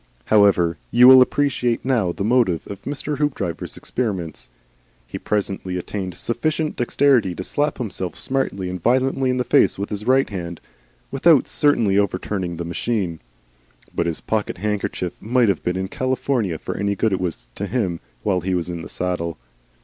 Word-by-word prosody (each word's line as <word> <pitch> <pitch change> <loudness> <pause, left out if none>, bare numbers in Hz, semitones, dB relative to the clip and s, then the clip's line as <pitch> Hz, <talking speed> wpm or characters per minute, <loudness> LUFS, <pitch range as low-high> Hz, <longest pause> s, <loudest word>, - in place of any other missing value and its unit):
However, 95 - +4
you 125 - +7
will 130 0 +10
appreciate 125 -3 +1
now 115 -9 +1
the 100 - -4
motive 110 -7 +2
of 100 -1 -8
Mr. 145 0 -3
Hoopdriver's 115 - -2
experiments. 95 -10 -4 0.6
He - - -7
presently 95 -3 -2
attained 95 0 -5
sufficient 155 - -1
dexterity 120 -6 +2
to 95 - -5
slap 145 +8 -1
himself 95 -7 -4
smartly 130 -8 -2
and 90 -1 -5
violently 130 +4 +2
in 125 - +1
the 125 - +1
face - - +3
with 100 +2 -4
his 105 +1 -4
right 135 +1 +4
hand, 85 -4 -6 0.5
without 140 +1 +4
certainly 115 -9 +2
overturning 95 -3 -2
the 85 - -4
machine; 85 -1 -2 0.7
but 85 - 0
his 85 - -2
pocket 110 -4 -2
handkerchief 100 -2 -2
might 120 0 +2
have 95 - 0
been 90 +1 -1
in 95 0 -2
California 130 - -1
for - - -5
any 100 0 -1
good 110 +1 +1
it 95 - -1
was 80 -9 -4
to 100 - -4
him 95 -8 -1 0.2
while 90 - +1
he 95 +1 -1
was 90 0 -2
in 85 -1 -5
the 80 - -9
saddle. 85 -3 -3
100 Hz, 170 wpm, -21 LUFS, 90-125 Hz, 0.7 s, will